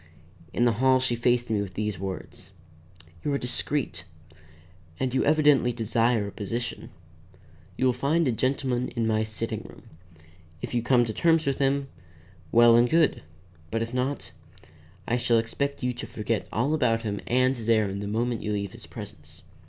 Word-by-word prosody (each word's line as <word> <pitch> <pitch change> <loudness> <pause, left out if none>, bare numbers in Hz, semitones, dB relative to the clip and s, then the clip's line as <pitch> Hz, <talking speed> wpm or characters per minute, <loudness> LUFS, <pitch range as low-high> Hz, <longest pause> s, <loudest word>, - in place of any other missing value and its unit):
In 120 - +1
the 120 - +4
hall 130 0 +5
she 125 -2 0
faced 120 0 +1
me 105 -2 +1
with 95 -2 -6
these 105 -3 -2
words: 95 -3 -6 0.7
"You 145 - -1
are - - +2
discreet, 135 +2 -2 1.0
and 130 -1 -1
you 130 - +2
evidently 145 -4 +4
desire 115 -1 +1
a 100 - -6
position. 115 +4 -4 0.9
You 130 - +1
will 130 - +4
find 145 +6 +1
a - - +3
gentleman 130 +1 0
in 115 -2 0
my 110 -1 +1
sitting 110 -1 -4
room. - - -14 0.8
If - - -6
you 120 - +1
come 120 0 +3
to 110 - -4
terms 165 +2 +3
with 140 -1 -1
him, 140 0 +1 0.6
well 120 0 +7
and 120 +1 +5
good. 160 -3 +3 0.5
If 115 +1 -2
not, 130 +3 -2 0.8
I 120 - +1
shall 120 -1 +2
expect 140 +5 -2
you 125 0 0
to 120 - -7
forget 110 0 -2
all 135 +7 0
about 115 -7 +1
him 100 -2 -3
and 130 +2 +3
his 115 -2 -5
errand 105 -3 +2
the 100 - -4
moment 115 +3 -1
you 105 - -2
leave 100 -2 -2
his - - -12
presence. - - -10
120 Hz, 175 wpm, -26 LUFS, 110-130 Hz, 1.0 s, well